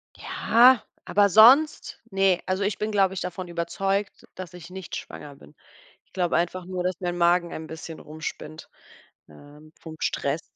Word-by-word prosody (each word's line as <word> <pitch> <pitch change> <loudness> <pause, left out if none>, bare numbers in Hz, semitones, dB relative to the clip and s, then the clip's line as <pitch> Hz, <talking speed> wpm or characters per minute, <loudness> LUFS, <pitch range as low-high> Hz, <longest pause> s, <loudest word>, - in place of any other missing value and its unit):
Ja, 245 0 +4 0.2
aber 200 +1 +3
sonst? 250 - +5
Ne, 195 -2 +2
also, 185 +2 -1
ich 200 -1 -1
bin, 215 +1 -3
glaube 195 -2 +2
ich, 190 - -5
davon 180 0 -5
überzeugt, 195 +4 -3
dass 185 -2 -9
ich 175 -1 -11
nicht 185 -1 -8
schwanger 145 -1 -9
bin. 75 - -18 0.5
Ich - - -39
glaube 180 -2 0
einfach 175 +1 -2
nur, 180 0 -4
dass 180 -1 -2
mein 175 -1 -3
Magen 175 0 +2
ein 160 0 -7
bisschen 160 0 -9
rumspinnt, 155 0 -8 0.6
ähm, 145 - -16
vom 160 -1 -10
Stress. 140 +3 -2
180 Hz, 165 wpm, -25 LUFS, 165-195 Hz, 0.6 s, sonst